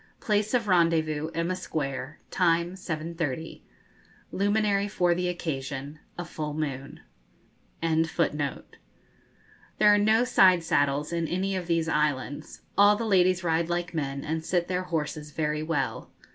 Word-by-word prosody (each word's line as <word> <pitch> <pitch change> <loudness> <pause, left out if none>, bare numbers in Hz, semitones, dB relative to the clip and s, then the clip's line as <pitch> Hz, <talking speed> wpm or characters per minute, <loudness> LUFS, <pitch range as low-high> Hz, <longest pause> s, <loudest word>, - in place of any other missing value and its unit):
Place 210 +2 +1
of 230 -3 0
rendezvous, 160 -4 +2
Emma 170 +2 0
Square: 140 -5 -4
time, 170 0 +2
seven 165 -3 -5
thirty; 160 -1 -4 0.7
Luminary 205 0 +1
for 180 -4 +2
the 180 +1 -1
occasion, 145 -4 -4 0.2
a 175 - -4
full 150 -3 -5
moon.'] 140 -3 -4 0.8
There 160 0 +1 1.6
are - - +5
no 220 +3 +4
side 185 -8 +5
saddles 145 0 +1
in 170 -1 -1
any 190 +3 -1
of 180 -2 -4
these 165 -1 +1
islands; 145 -3 -1
all 205 +1 +6
the 230 +2 -3
ladies 185 -3 +3
ride 165 0 +1
like 175 0 -2
men, 140 -3 -3
and 160 +1 -2
sit 175 0 0
their 185 0 -2
horses 155 -2 -3
very 150 0 -2
well. 155 -4 -2
165 Hz, 135 wpm, -27 LUFS, 150-185 Hz, 1.6 s, all